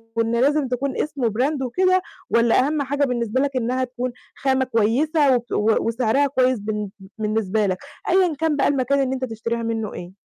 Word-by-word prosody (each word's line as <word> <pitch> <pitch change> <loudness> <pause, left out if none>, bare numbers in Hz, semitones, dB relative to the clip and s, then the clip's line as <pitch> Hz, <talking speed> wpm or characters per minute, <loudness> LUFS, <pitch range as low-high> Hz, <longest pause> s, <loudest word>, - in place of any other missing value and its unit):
وإن 230 0 +1
لازم 290 0 +2
تكون 260 +2 -2
اسمه 275 -6 -1
Brand 265 +7 -1
وكده 370 +9 +2 0.3
والّا 235 +3 +3
أهَم 300 -1 -1
حاجة 285 +1 -1
بالنسبة 245 0 -1
لك 280 -2 -1
إنها 255 +1 0
تكون 250 0 -4 0.2
خامة 265 -1 +1
كويسة 260 +5 +2
وت 240 0 -4 0.3
وسعرها 240 +4 +1
كويس 255 -3 +1
بالن 210 0 -3 0.3
بالنسبة 215 -1 0
لك، 185 -2 0 0.3
أيًا 360 -3 +3
كان 320 -2 +1
بقى 275 - +2
المكان 280 0 +1
اللي 265 0 0
أنت 260 0 -2
تشتريها 230 0 -4
منه 225 -2 -3
إيه؟ 175 0 -8
255 Hz, 175 wpm, -22 LUFS, 230-280 Hz, 0.3 s, والّا